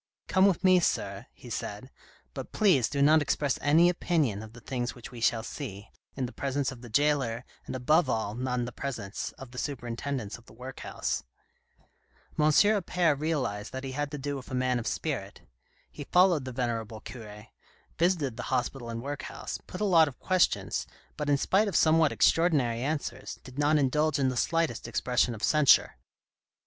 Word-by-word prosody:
" - - -58
Come 190 +1 +5
with 195 -2 +1
me, 185 -1 +6
sir," 175 - -1
he - - -13
said, - - -5 0.2
" - - -31
but - - -7
please 180 - +3
do 140 -1 +1
not 155 +2 +6
express 145 -1 0
any 160 +4 +5
opinion 160 - 0
of 110 0 -10
the 120 - -12
things 120 0 -3
which 120 -1 -10
we 120 -2 -9
shall 115 -1 +2
see, 110 -6 -7 0.2
in 135 - -1
the 120 - -6
presence 140 0 -2
of 125 -3 -11
the 120 - -10
jailer, 130 -2 +1 0.2
and - - -4
above 150 +4 +3
all 110 -3 -1
not 125 +2 -2
in 120 - 0
the 125 - -6
presence 115 -6 -5
of 135 -2 -11
the 125 - -6
superintendents 120 -3 -4
of 120 - -23
the - - -15
workhouse." 130 +2 -4 1.2
M. 150 - +4
Appert 175 -2 +3
realised 130 -10 -2
that 130 +1 -5
he 135 - -4
had 145 +2 -2
to 150 - -5
do 145 0 -3
with 130 - -10
a 130 - -3
man 125 -1 +1
of 115 - -5
spirit. - - -3 0.5
He 145 - -8
followed 180 -5 +4
the 130 - -5
venerable 115 -3 -3
cure, 105 -3 -10 0.5
visited 165 -8 +1
the - - -4
hospital 130 -1 -2
and 115 0 -5
workhouse, 140 0 -5
put 180 - -7
a - - +2
lot 165 -5 +6
of 135 - -7
questions, 185 -1 +1 0.3
but 150 -1 -3
in 145 - +4
spite 195 +9 +2
of 195 - -3
somewhat 160 -1 +4
extraordinary 140 -9 +2
answers, 135 -3 -3
did 130 +2 -10
not 150 +1 +4
indulge 150 +2 +2
in 135 -2 +2
the 130 - -3
slightest 165 +5 0
expression 125 -1 +1
of 110 - -10
censure. 150 - +4
135 Hz, 190 wpm, -29 LUFS, 120-155 Hz, 1.2 s, me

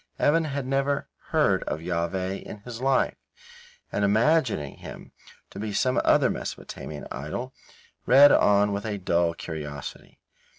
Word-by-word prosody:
Evan 165 +2 +3
had 140 -3 -3
never 140 +1 0 0.2
heard - - +2
of 75 - -3
Jahveh 90 +3 -2
in - - -9
his 120 +2 -8
life, 135 0 +2 0.8
and 105 - -1
imagining 110 - +2
him - - -10 0.4
to - - -9
be 105 0 -3
some 130 +4 +2
other - - +4
Mesopotamian 75 -1 -6
idol, 100 - -5 0.5
read 140 +3 +8
on 105 0 +4
with 100 0 -3
a 105 -2 -3
dull 85 -3 +1
curiosity. 75 -4 -7
105 Hz, 135 wpm, -26 LUFS, 85-130 Hz, 0.8 s, read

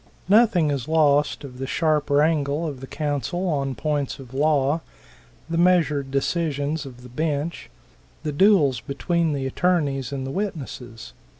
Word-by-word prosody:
Nothing 200 -7 +4
is 140 -2 -3
lost 150 -2 +2
of 130 -2 -10
the 135 - -3
sharp 155 0 +1
wrangle 145 +1 +2
of 145 -5 -5
the 135 - -8
counsel 155 +6 -2
on 140 -5 -1
points 145 +3 -2
of 130 -2 -12
law, 145 +1 +2 0.7
the 165 0 -1
measured 165 -6 +3
decision's 145 +1 -1
of 125 -1 -12
the 125 - -11
bench; 155 +4 -3 0.5
the 150 - -2
duels 150 - +4
between 165 +4 -1
the 135 -2 -2
attorneys 140 -3 0
and 135 -1 -4
the 135 - -4
witnesses. 135 - -5
145 Hz, 145 wpm, -23 LUFS, 135-165 Hz, 0.7 s, Nothing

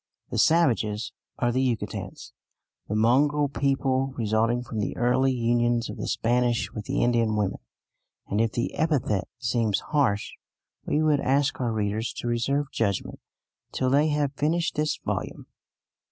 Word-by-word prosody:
The - - -1
savages 115 -10 +2 0.2
are 120 - +1
the 130 +2 +1
Yucatecans, 125 -4 -3 0.6
the 105 - -2
mongrel 140 +6 +3
people 135 -1 0
resulting 115 +2 +1
from 115 -3 -5
the 105 - -2
early 130 +2 +2
unions 120 -1 +1
of - - -9
the - - -4
Spanish 120 0 +1
with 105 -2 -6
the - - 0
Indian 115 -2 +2
women; 105 -2 -1 0.7
and 105 +2 0
if 115 -1 +1
the 120 +2 -2
epithet 145 - 0
seems 115 -4 0
harsh, 125 -9 +1 0.6
we 155 - +1
would 150 -2 +3
ask 140 +1 +1
our 120 -2 0
readers 110 +1 -2
to - - -5
reserve 135 +4 0
judgment 100 -5 -2 0.5
till 130 -1 0
they 145 +3 +4
have 145 -2 0
finished 165 +4 0
this 150 -1 0
volume. - - -3
120 Hz, 150 wpm, -26 LUFS, 115-140 Hz, 0.7 s, they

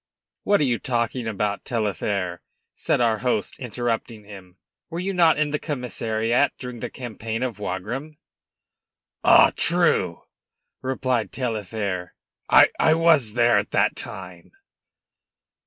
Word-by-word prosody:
"What 205 0 +2
are - - +4
you 120 -4 +1
talking 120 -1 -2
about, 105 -1 -2
Taillefer"; 100 -5 -2 0.3
said - - 0
our 115 -2 +2
host, 125 +2 -1
interrupting 120 -2 -3
him. 95 -3 -13 0.3
"Were 170 0 -5
you 195 +2 -2
not 170 -4 +4
in 150 -1 0
the 150 - -1
commissariat 120 -3 -1
during 125 -2 -7
the - - -4
campaign 115 -1 -5
of 120 -5 -3
Wagram?" 115 +11 -5 1.1
"Ah, - - +7
true!" - - +1 0.6
replied 130 -3 -1
Taillefer, 105 -6 -3 0.3
"I 160 - +5
was 155 -10 +3
there 120 0 +4
at - - -4
that - - +2
time." - - -5
120 Hz, 125 wpm, -23 LUFS, 105-130 Hz, 1.1 s, Ah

